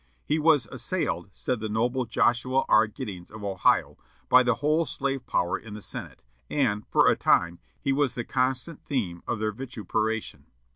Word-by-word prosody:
"He 155 Hz, -, +1 dB
was 150 Hz, -5 st, +4 dB
assailed," -, -, -2 dB
said 125 Hz, -3 st, -2 dB
the 110 Hz, 0 st, -4 dB
noble 120 Hz, +4 st, 0 dB
Joshua 120 Hz, +3 st, +1 dB
R. 110 Hz, +1 st, +5 dB
Giddings 95 Hz, -4 st, -7 dB
of 110 Hz, -1 st, -10 dB
Ohio, 95 Hz, -2 st, +1 dB, 0.3 s
"by 125 Hz, -, +8 dB
the 125 Hz, -1 st, +2 dB
whole 155 Hz, +5 st, +2 dB
slave 135 Hz, -1 st, -3 dB
power 85 Hz, -, 0 dB
in 110 Hz, -2 st, -10 dB
the -, -, -7 dB
Senate, -, -, -6 dB, 0.3 s
and, 110 Hz, -8 st, 0 dB
for -, -, +4 dB
a -, -, +5 dB
time, 85 Hz, 0 st, +2 dB, 0.2 s
he 135 Hz, -, 0 dB
was 140 Hz, -2 st, +1 dB
the 120 Hz, -, -3 dB
constant 130 Hz, +4 st, -1 dB
theme 95 Hz, -11 st, -2 dB
of -, -, -1 dB
their 110 Hz, 0 st, -1 dB
vituperation. 110 Hz, -2 st, -3 dB
120 Hz, 175 wpm, -27 LUFS, 105-135 Hz, 0.3 s, by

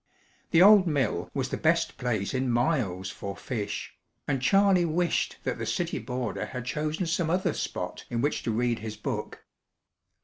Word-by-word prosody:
The 170 Hz, +1 st, +6 dB
old 200 Hz, -2 st, +8 dB
mill 140 Hz, -8 st, 0 dB
was -, -, -2 dB
the -, -, -2 dB
best -, -, +1 dB
place 110 Hz, -5 st, -1 dB
in 130 Hz, 0 st, 0 dB
miles 120 Hz, -, 0 dB
for 100 Hz, 0 st, -6 dB
fish, 105 Hz, -5 st, -4 dB, 0.3 s
and 135 Hz, -3 st, 0 dB
Charley 195 Hz, +4 st, +4 dB
wished 170 Hz, +1 st, 0 dB
that -, -, -2 dB
the -, -, -2 dB
city -, -, -1 dB
boarder 125 Hz, -1 st, -3 dB
had 125 Hz, -2 st, -6 dB
chosen 155 Hz, +6 st, -2 dB
some 165 Hz, 0 st, 0 dB
other 180 Hz, 0 st, +1 dB
spot -, -, -4 dB
in 120 Hz, -, -2 dB
which 145 Hz, +5 st, 0 dB
to 115 Hz, -, -2 dB
read 120 Hz, +1 st, 0 dB
his 110 Hz, 0 st, -6 dB
book. 105 Hz, -, -5 dB
130 Hz, 170 wpm, -28 LUFS, 115-170 Hz, 0.3 s, old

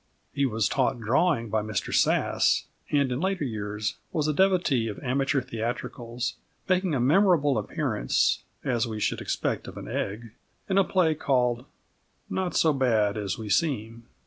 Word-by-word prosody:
He 140 Hz, -1 st, +1 dB
was 110 Hz, -3 st, 0 dB
taught 130 Hz, -2 st, 0 dB
drawing 115 Hz, -, +1 dB
by 110 Hz, -, +1 dB
Mr 110 Hz, 0 st, -3 dB
Sass, -, -, +2 dB, 0.2 s
and 140 Hz, -3 st, +2 dB
in 125 Hz, -, -1 dB
later 190 Hz, -3 st, 0 dB
years 105 Hz, -3 st, -3 dB
was 155 Hz, -2 st, 0 dB
a 150 Hz, -, +1 dB
devotee 170 Hz, -9 st, +2 dB
of 105 Hz, -, -5 dB
amateur 135 Hz, +1 st, +1 dB
theatricals, 120 Hz, 0 st, -4 dB, 0.3 s
making 185 Hz, -4 st, +1 dB
a -, -, 0 dB
memorable 145 Hz, +1 st, +4 dB
appearance, 60 Hz, -, 0 dB, 0.2 s
as 120 Hz, -3 st, 0 dB
we 110 Hz, -1 st, -4 dB
should -, -, -1 dB
expect -, -, -2 dB
of -, -, -9 dB
an -, -, -7 dB
Egg, 110 Hz, +3 st, -4 dB, 0.4 s
in 195 Hz, 0 st, +3 dB
a -, -, +5 dB
play 180 Hz, -4 st, +2 dB
called 125 Hz, -4 st, 0 dB, 0.7 s
Not 185 Hz, -2 st, -2 dB
so 160 Hz, -2 st, +4 dB
Bad 115 Hz, -6 st, +2 dB
as 100 Hz, -3 st, -3 dB
We 110 Hz, -, -6 dB
Seem. 115 Hz, -, -1 dB
125 Hz, 160 wpm, -27 LUFS, 110-150 Hz, 0.7 s, a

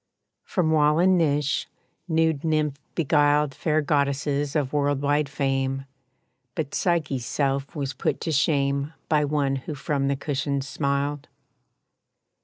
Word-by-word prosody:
From 170 Hz, -5 st, 0 dB
wall 150 Hz, -1 st, +4 dB
and 185 Hz, +2 st, +4 dB
niche, 150 Hz, -4 st, +1 dB, 0.4 s
nude 160 Hz, -3 st, +1 dB
nymph 155 Hz, -3 st, 0 dB, 0.2 s
beguiled 145 Hz, -2 st, +3 dB
Fair 155 Hz, +2 st, 0 dB
goddesses 140 Hz, 0 st, 0 dB
of 145 Hz, -3 st, 0 dB
world 145 Hz, -1 st, +1 dB
wide 145 Hz, 0 st, +1 dB
fame, 135 Hz, -1 st, -1 dB, 0.7 s
But 155 Hz, -3 st, -3 dB
Psyche's 150 Hz, -8 st, 0 dB
self 140 Hz, 0 st, -1 dB
was 140 Hz, -2 st, -3 dB
put 130 Hz, -, -1 dB
to 165 Hz, -, -2 dB
shame 140 Hz, 0 st, +1 dB, 0.2 s
By 150 Hz, -1 st, +3 dB
one 140 Hz, -2 st, 0 dB
who 145 Hz, +3 st, -6 dB
from 140 Hz, 0 st, -1 dB
the 140 Hz, -, +1 dB
cushions 140 Hz, -1 st, -2 dB
smiled. 140 Hz, 0 st, -1 dB
145 Hz, 130 wpm, -25 LUFS, 140-155 Hz, 0.7 s, wall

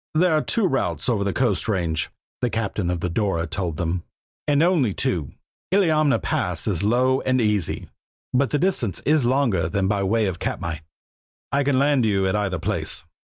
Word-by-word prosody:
"There 175 Hz, +1 st, +4 dB
are 155 Hz, -, +3 dB
two 225 Hz, +5 st, +1 dB
routes 90 Hz, -, -1 dB
over 105 Hz, -5 st, +1 dB
the 100 Hz, -, 0 dB
coast 105 Hz, -7 st, 0 dB
range," 85 Hz, -6 st, 0 dB, 0.3 s
the 125 Hz, -, +1 dB
captain 110 Hz, -5 st, -2 dB
of 90 Hz, -2 st, -2 dB
the -, -, 0 dB
Dora 85 Hz, -2 st, 0 dB
told 85 Hz, -1 st, -3 dB
them, 85 Hz, +1 st, -1 dB, 0.5 s
"and 145 Hz, +1 st, +3 dB
only 155 Hz, -, +2 dB
two. 80 Hz, -7 st, -1 dB, 0.4 s
Illiamna 155 Hz, -7 st, +3 dB
Pass 90 Hz, -3 st, -1 dB
is 95 Hz, -7 st, 0 dB
low 125 Hz, +5 st, +2 dB
and 130 Hz, 0 st, +1 dB
easy, 105 Hz, -6 st, 0 dB, 0.5 s
but 130 Hz, +1 st, +2 dB
the 150 Hz, -, +1 dB
distance 145 Hz, -, 0 dB
is 150 Hz, -5 st, +3 dB
longer 120 Hz, -, +1 dB
than 95 Hz, +2 st, 0 dB
by 100 Hz, 0 st, 0 dB
way 110 Hz, +3 st, +1 dB
of 95 Hz, -3 st, -3 dB
Katmai. 80 Hz, -2 st, -3 dB, 0.7 s
I 140 Hz, +1 st, +2 dB
can 140 Hz, -1 st, +1 dB
land 140 Hz, -1 st, +3 dB
you 100 Hz, -3 st, +2 dB
at 95 Hz, -, +1 dB
either 100 Hz, -3 st, -1 dB
place." 80 Hz, -, -1 dB
105 Hz, 185 wpm, -23 LUFS, 90-135 Hz, 0.7 s, There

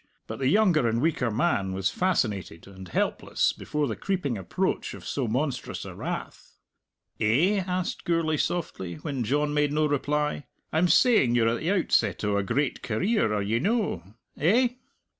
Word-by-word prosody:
But 110 Hz, -, -7 dB
the 130 Hz, -, +1 dB
younger 170 Hz, -, +4 dB
and 115 Hz, +1 st, +1 dB
weaker 135 Hz, -4 st, +1 dB
man 105 Hz, -, 0 dB
was 95 Hz, 0 st, 0 dB
fascinated 105 Hz, -, -1 dB
and 95 Hz, -1 st, -11 dB
helpless -, -, 0 dB
before 150 Hz, -1 st, -2 dB
the 110 Hz, -, -3 dB
creeping 180 Hz, -10 st, -2 dB
approach 95 Hz, -3 st, -2 dB
of -, -, -12 dB
so 135 Hz, -4 st, -2 dB
monstrous 130 Hz, +5 st, -2 dB
a -, -, -7 dB
wrath. -, -, -6 dB, 0.6 s
"Eh?" 155 Hz, -, +3 dB
asked 185 Hz, -1 st, -3 dB
Gourlay 165 Hz, -2 st, +1 dB
softly, 95 Hz, -, -2 dB
when 130 Hz, -, -4 dB
John 145 Hz, +5 st, 0 dB
made 150 Hz, -1 st, +2 dB
no 155 Hz, +1 st, +2 dB
reply; 150 Hz, -1 st, -1 dB, 0.3 s
"I'm 165 Hz, +3 st, +3 dB
saying 170 Hz, -, +4 dB
you're 115 Hz, -1 st, +3 dB
at 115 Hz, -, -1 dB
the 165 Hz, -, -2 dB
outset 195 Hz, -, +1 dB
o' 105 Hz, -1 st, +1 dB
a 100 Hz, -, +2 dB
great 125 Hz, +7 st, -1 dB
career; 155 Hz, -, 0 dB
are 105 Hz, -1 st, 0 dB
ye 110 Hz, +3 st, 0 dB
no? 205 Hz, -, 0 dB, 0.4 s
Eh?" 230 Hz, -, +4 dB
145 Hz, 165 wpm, -26 LUFS, 110-170 Hz, 0.6 s, younger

